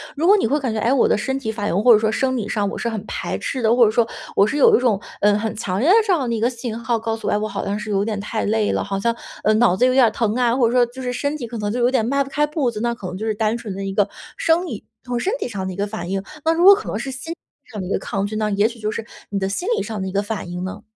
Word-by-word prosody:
如 305 +3 -1
果 405 +4 +7
你 380 - +1
会 285 - +1
感 250 -5 -1
觉： 220 - -2
“哎， 235 +4 +2
我 275 - +3
的 - - +3
身 265 +5 -2
体 240 -5 -3
反 210 -2 -3
应 170 - 0
或 245 - +7
者 215 - +7
说 220 0 +1
生 260 +3 0
理 215 -3 -3
上 205 -1 0
我 - - -6
是 - - -3
很 220 -3 -4
排 - - -3
斥 260 - -3
的。” 225 - +2
或 245 - +6
者 215 - +4
说 230 +1 +2 0.3
我 200 - +5
是 290 - -2
有 295 - +6
一 - - 0
种， 240 -5 +2 0.2
嗯， 205 0 +4
很 220 +1 -2
强 185 -3 -2
烈 290 - +3
的 385 - +7
这 395 - +3
样 265 -8 0
一 230 - -1
个 235 +3 +2
信 235 -2 -5
号 235 0 0
告 225 0 -2
诉 - - -6
我： - - +1
“哎， - - +2
我 210 - -2
好 200 -1 -4
像 200 +1 -1
是 210 0 -6
有 200 0 +1
点 215 -1 -2
太 215 +2 -3
累 215 0 +1
了， - - 0
好 200 0 -2
像， 230 +4 +1 0.3
嗯， 215 0 +3
脑 235 -6 +4
子 245 - +3
有 255 - +4
点 255 -3 +5
疼 220 -3 0
啊。” 245 -1 +2
或 250 -3 +3
者 - - -2
说 245 0 +4
就 245 +2 -10
是 250 -1 -2
身 285 +4 -2
体 295 - -5
可 235 0 -7
能 210 -1 -2
就 240 +4 -2
有 245 +1 +3
点 250 -5 +1
迈 280 +3 +1
不 275 - -11
开 295 +2 +1
步 295 -5 0
子， 215 - -6
那 235 0 0
可 200 -5 -7
能 180 +1 -6
就 215 - -4
是 215 - 0
单 220 +2 0
纯 225 -4 -6
的 195 - -5
一 195 0 -3
个 205 0 +2 0.3
生 335 +2 +2
理 235 - -7 0.2
从 245 -1 -2
身 385 - -1
体 375 - -4
上 195 -4 -4
的 190 - -4
一 - - -9
个 200 +2 -1
反 205 -4 -6
应。 195 0 -2 0.2
那 325 - +4
如 335 +1 +1
果 395 +2 +10
可 415 +2 -3
能 - - -2
是 275 - -4
心 265 +5 -7
理 - - -19 0.3
上 210 -4 -5
的 180 - -5
一 - - -5
个 - - +1
抗 195 0 -2
拒， 210 +1 -5
那 215 -1 0
也 205 +1 +2
许 235 0 -9
就 215 -1 -2
是 220 0 -5 0.2
你 205 - -2
的 190 0 -1
心 350 - -3
理 - - -1
上 215 -3 -5
的 190 - -3
一 - - -4
个 200 +1 +1
反 210 -3 -5
应 180 0 -4
呢。 185 - -6
225 Hz, 385 characters per minute, -21 LUFS, 205-255 Hz, 0.3 s, 果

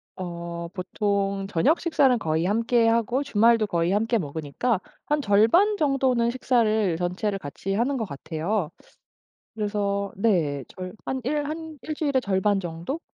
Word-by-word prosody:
어 170 -2 -5
보통 195 +1 -1
저녁 240 - +2
식사는 275 -7 +3
거의 160 -2 0
함께하고 230 +4 +2
주말도 230 -3 +3
거의 170 -2 0
함께 225 +4 +2
먹으니까 160 - -2 0.3
한 295 0 +1
절반 250 - +4
정도는 265 -6 +2
식사를 220 -8 +1
전체를 185 +4 -1
같이 180 +4 -5
하는 245 +7 +1
것 225 - -2
같아요. 160 +4 -3 0.9
그래서 205 -2 -1
네. 165 - +1
절 185 -1 -7
한 265 - -2
일 290 +3 -1
한 315 0 -6
1 310 - -4
주일에 285 -4 +1
절반 200 -1 +1
정도? 175 - -5
210 Hz, 275 characters per minute, -25 LUFS, 180-250 Hz, 0.9 s, 절반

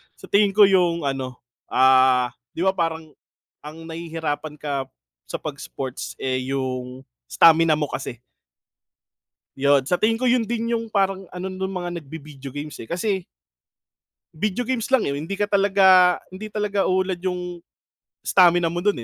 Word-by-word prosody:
Sa - - -14
tingin 200 -1 +4
ko 210 - +7
yung 175 -3 +2
ano, 135 -2 -4 0.3
ah, 130 -1 +4 0.2
'di 170 - -2
ba, 190 - +4
parang 165 -3 -2 0.5
ang 155 +2 -9
nahihirapan 160 -2 -4
ka 140 -2 -3 0.4
sa - - -5
'pag - - -5
sports - - -6
eh 130 -1 0 0.2
yung 130 -1 -4 0.2
stamina 165 -1 +5
mo 150 -1 -1
kasi. 125 -3 -5 1.4
Yun 140 0 +3
sa 180 +5 0
tingin 225 +1 +3
ko, 255 - -2
yun 245 -2 +3
din 230 0 -1
yung 230 -1 -2
parang 195 -2 -1
ano 180 +1 -7
nung 190 0 -4
mga 175 -1 -5
nagvi-video 145 -2 -10
games 145 +3 -7
eh. 115 - -11
Kasi 190 +1 -1 1.1
Video 210 +8 -2
games 245 0 -2
lang 265 -3 +3
eh. 140 - -1
Hindi 160 +8 -4
ka 205 - +1
talaga 195 -3 +5 0.2
hindi 215 +3 -7
talaga 205 -1 -1
uunlad 185 -1 0
yung 180 -1 -4 0.6
stamina 175 -2 +4
mo 175 - -2
dun 205 +2 +1
175 Hz, 155 wpm, -23 LUFS, 145-195 Hz, 1.4 s, ko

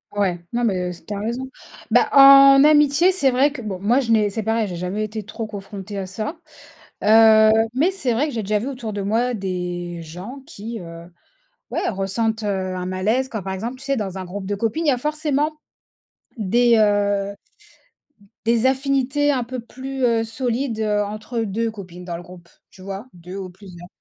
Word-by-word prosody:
Ouais. 190 -4 0
Non 240 +1 0
mais 220 -5 +2 0.2
s 175 -1 -10
tu 210 - -5
as 200 - -4
raison. 240 +5 -4 0.4
Bah, - - +4
en 275 0 +9
amitié, 300 +4 +5
c'est 285 -8 +2
vrai 265 +3 +3
que, 275 -3 -7
bon, 200 -4 -5
moi, 230 +7 +2
je 235 -4 -1
n'ai 215 -2 +3
c'est 220 - -3
pareil, 225 0 0
j'ai 180 - -6
jamais 180 +5 -3
été 215 0 -4
trop 220 +2 -6
confrontée 200 -1 -7
à 190 - -4
ça, 215 - -5 0.7
heu, 220 0 +7 0.2
mais 310 +8 +3
c'est 275 -11 -2
vrai 280 +7 +1
que 280 - -6
j'ai 225 - -2
déjà 210 +1 0
vu 235 - -4
autour 245 -5 -5
de 205 - -4
moi 225 +5 0
des 180 -4 -4
gens 180 - -9
qui, 225 -5 -7
heu, 170 0 -10 0.6
ouais, - - -1
ressentent, 220 +3 -2
heu, - - -1 0.3
un 180 0 -4
malaise, 215 +8 0
comme 220 -5 -5
par 190 +1 -4
exemple, 230 +7 -5
tu 270 - -12
sais, 275 -1 0
dans 195 -3 -4
un 185 - -5
groupe 190 +2 -7
de 205 - -1
copines, 230 +10 -2
il - - +2
y - - +5
a 250 - -1
forcément 300 +1 -1 0.8
des, 235 +3 +3
heu 205 -1 +2 1.1
des 235 +1 +2
affinités 275 +2 +1
un 260 -3 0
peu 250 +1 -6
plus, 265 +2 -4
heu, 230 -1 +2
solides, 235 +1 -2
heu, 210 -1 +1
entre 215 +3 -5
deux 225 +2 -1
copines, 180 -5 -10
dans 175 -1 -4
le 175 - -8
groupe, 175 -1 -14 0.2
tu 185 - -17
vois? 195 +3 -6
Deux 180 +2 -10
ou 190 -2 -6
plusieurs. 180 -2 -13
220 Hz, 200 wpm, -21 LUFS, 195-255 Hz, 1.1 s, en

